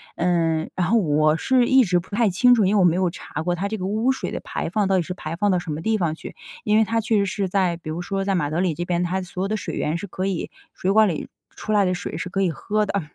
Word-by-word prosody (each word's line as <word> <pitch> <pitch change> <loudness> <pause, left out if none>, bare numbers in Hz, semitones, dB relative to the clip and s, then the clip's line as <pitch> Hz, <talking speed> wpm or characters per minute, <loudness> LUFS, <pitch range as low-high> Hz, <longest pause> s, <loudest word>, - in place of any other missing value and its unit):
嗯， 165 -2 +1
然 180 - 0
后 230 - +3
我 155 -4 +2
是 255 +2 +2
一 265 -1 +6
直 180 -4 +2
不 175 - -12
太 230 -1 +3
清 245 +7 +5
楚， 220 -4 +3
因 195 +3 +2
为 - - +4
我 - - +5
没 170 -1 +4
有 185 -1 +1
查 160 -3 -6
过 175 +1 0
它 190 +3 -2
这 220 - -3
个 185 - -4
污 220 +6 +1
水 265 - -4
的 - - -3
排 - - -4
放 205 0 +1
到 195 - +2
底 180 - +1
是 180 - -5
排 165 -3 -6
放 205 +3 +1
到 180 - +2
什 175 -2 -6
么 150 +2 -4
地 220 +4 +1
方 165 -4 0
去， - - -10 0.3
因 210 0 +3
为 220 - +5
它 225 +2 0
确 220 0 +1
实 200 - +2
是 195 +1 -2
在， 180 -2 +1
比 165 -2 -9
如 165 +3 -4
说 195 +2 -3
在 195 - +1
马 150 -5 0
德 155 +3 -1
里 180 -2 +1
这 175 +3 -4
边， 175 0 0
它 185 +2 -1
所 180 0 -5
有 - - 0
的 215 - -1
水 - - -5
源 155 +3 -1
是 205 - -6
可 185 +1 -4
以 190 -4 -2 0.2
水 190 - -1
管 215 +1 +5
里 160 - -4 0.2
出 215 - -6
来 205 -2 +4
的 180 - +1
水 175 -3 -5
是 170 - -4
可 195 +1 -1
以 190 - +2
喝 210 +6 -1
的。 200 - -1
185 Hz, 340 characters per minute, -23 LUFS, 170-210 Hz, 0.3 s, 一